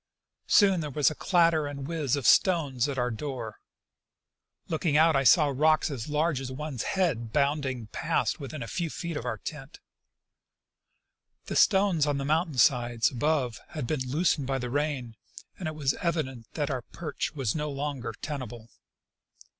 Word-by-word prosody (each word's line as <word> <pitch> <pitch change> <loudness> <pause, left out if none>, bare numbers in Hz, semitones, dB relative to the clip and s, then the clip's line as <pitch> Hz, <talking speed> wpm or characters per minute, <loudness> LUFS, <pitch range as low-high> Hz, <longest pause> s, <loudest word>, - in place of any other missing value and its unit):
Soon 195 -4 +5
there 150 -2 -3
was 145 +1 +2
a - - -4
clatter 165 -4 +2
and 140 -1 -6
whiz 155 -6 0
of 140 -4 -4
stones 145 -8 +3
at 135 - -4
our 125 0 0
door. 115 -3 -5 1.1
Looking 160 -2 +1
out 160 0 +5
I 135 - +3
saw 150 +2 +6
rocks 155 +2 +3
as 130 -1 -5
large 150 -1 0
as 130 -1 -5
one's 140 -2 -5 0.2
head 125 -12 0
bounding 140 -4 0
past 105 - -1
within 140 -1 -6
a - - -7
few 170 +3 -2
feet 170 +1 -5
of 135 - -4
our 120 -3 -2
tent. 145 - -8 1.7
The - - -5
stones 190 -7 +4
on 145 -1 0
the 135 - -3
mountain 155 0 0
side 120 -3 +3
above 135 -2 0
had 150 -6 -5
been 130 -1 -2
loosened 150 -1 +1
by 135 -1 0
the 125 -2 -4
rain, 140 -5 -2 0.4
and 180 - -3
it 155 - -4
was 140 -3 +1
evident 135 -9 -2
that 145 -2 -1
our 130 -2 -2
perch 165 +6 -5
was 130 -6 -1
no 150 -1 -2
longer 140 -4 -4
tenable. 120 -6 -6
145 Hz, 170 wpm, -28 LUFS, 130-155 Hz, 1.7 s, saw